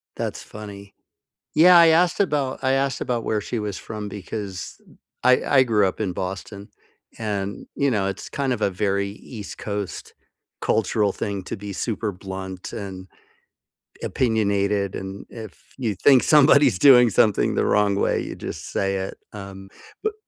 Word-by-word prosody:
That's - - -4
funny. 100 -2 -10 0.6
Yeah, 175 +3 +8
I 170 -1 +8
asked 170 +3 +3
about 145 -8 0
I 130 0 +2
asked 135 0 0
about 120 -2 -2
where 110 - 0
she 115 +3 -4
was 105 -2 -4
from 105 -1 -6
because 100 -1 -7 0.4
I 125 0 +4
I 135 -2 +5
grew 105 -5 +2
up 95 - -4
in 95 -4 -1
Boston. 100 +3 -6 0.5
And, 100 -3 -4
you 140 0 +2
know, 100 -3 0
it's 95 - -6
kind 140 -2 -1
of 125 - -3
a 100 - +1
very 100 +1 -1
East 105 0 -9
Coast 100 -2 -5 0.5
cultural 105 -1 +1
thing 100 -2 -4
to - - -5
be 100 0 -7
super 110 0 -2
blunt 95 0 -7
and 95 -2 -7 1.0
opinionated, 100 -4 0
and 95 +1 -7
if 110 -5 -11
you 115 -6 -2
think 130 +6 +5
somebody's 140 -6 +5
doing 125 -4 +7
something 105 0 +2
the - - +1
wrong 105 -1 +2
way, - - +1
you - - -6
just - - -7
say 95 0 0
it. 95 0 -4 0.2
Um, 95 -1 -9 0.4
but, 435 0 0
105 Hz, 160 wpm, -23 LUFS, 100-125 Hz, 1.0 s, Yeah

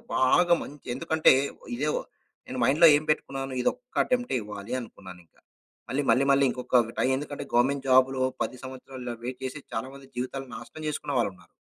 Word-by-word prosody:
బాగా 170 +7 +4
మంచి 145 0 -12
ఎందుకంటే, 160 -1 +4 0.4
ఇదే 145 +5 -1 0.6
నేను 130 - -5
మైండ్‌లో 155 +7 +6
ఏం 150 - +1
పెట్టుకున్నాను? 135 -3 -3
ఇదొక్క 250 - -3
అటెంప్టే 245 - 0
ఇవ్వాలి 105 +2 -7
అనుకున్నానింక. 90 -6 -13 0.5
మళ్ళీ, 140 +3 0
మళ్ళీ, 135 +2 +4
మళ్ళీ 140 0 +4
ఇంకొకట్టా, 125 -2 +1
ఎందుకంటే 145 +1 -5
గవర్నమెంట్ 135 +3 +2
జాబ్‌లో 130 0 +4 0.2
10 125 - -5
సంవత్సరాలు 130 0 -9
ఇలా 120 - -2
వెయిట్ 125 +1 -5
చేసి 130 +3 -5
చాలామంది 135 +4 -5
జీవితాలు 130 +2 -4
నాశనం 155 +7 -9
జేసుకున్న 150 -1 -3
వాళ్ళున్నారు. 90 -6 -3
130 Hz, 150 wpm, -27 LUFS, 125-145 Hz, 0.6 s, మైండ్‌లో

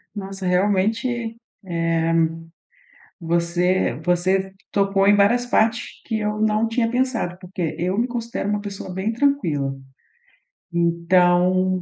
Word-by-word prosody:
Nossa, 195 -1 -6
realmente, 195 +5 +1
eh, 235 -2 -3 1.9
você 170 -1 +1
você 185 +2 +1 0.2
tocou 195 -1 +2
em 205 - +6
várias 235 +5 +3
partes 225 -1 +2 0.2
que 220 -1 -1
eu 210 0 -2
não 215 +1 +2
tinha 230 0 0
pensado, 245 -8 -1
porque 180 -3 -4
eu 185 +4 -1
me 240 - +2
considero 235 -4 -4
uma 210 0 0
pessoa 200 -2 -7
bem 190 +5 -2
tranquila, 170 - 0 1.0
então, 175 +2 +2
195 Hz, 115 wpm, -22 LUFS, 180-225 Hz, 1.9 s, em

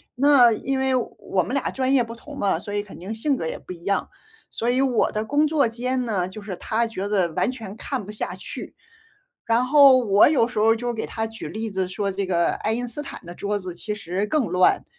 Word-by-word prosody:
那 255 -3 +6
因 265 +5 -2
为 265 0 +2
我 195 -6 -1
们 245 - -5
俩 275 - 0
专 265 0 0
业 270 - +5
不 230 0 -8
同 280 +5 -11
嘛， 195 -5 +1
所 205 +3 -7
以 205 - 0
肯 205 -1 -12
定 190 +5 -6
性 270 +6 0
格 165 - -4
也 160 - -4
不 - - -9
一 170 -1 -14
样。 200 +1 0 0.4
所 235 - -2
以 250 +1 +2
我 255 -4 +2
的 215 +1 -2
工 290 +6 +2
作 300 -4 +2
间 250 +2 -2
呢， 190 -6 -1
就 210 +3 -9
是 200 -2 -6
他 225 +6 -1
觉 205 -3 -4
得 185 -5 +1
完 245 - +1
全 220 -6 -8
看 250 -1 -4
不 210 - -8
下 210 - -4
去。 - - -8 0.7
然 230 +2 +2
后 275 -1 +7
我 210 -3 +5
有 275 -7 +3
时 245 - -9
候 220 +1 +5
就 240 +1 -3
给 225 - -3
他 225 0 -3
举 225 0 -8
例 220 +1 -4
子 190 -2 -2
说 200 +1 -2
这 195 +1 -2
个 170 -2 +1
爱 215 - -2
因 245 +2 -2
斯 240 +5 -5
坦 285 - -8
的 175 +1 -9
桌 205 +2 -2
子 185 -3 -7
其 210 +4 -4
实 195 -1 -3
更 270 +4 +1
乱。 180 0 +3
225 Hz, 265 characters per minute, -23 LUFS, 200-255 Hz, 0.7 s, 后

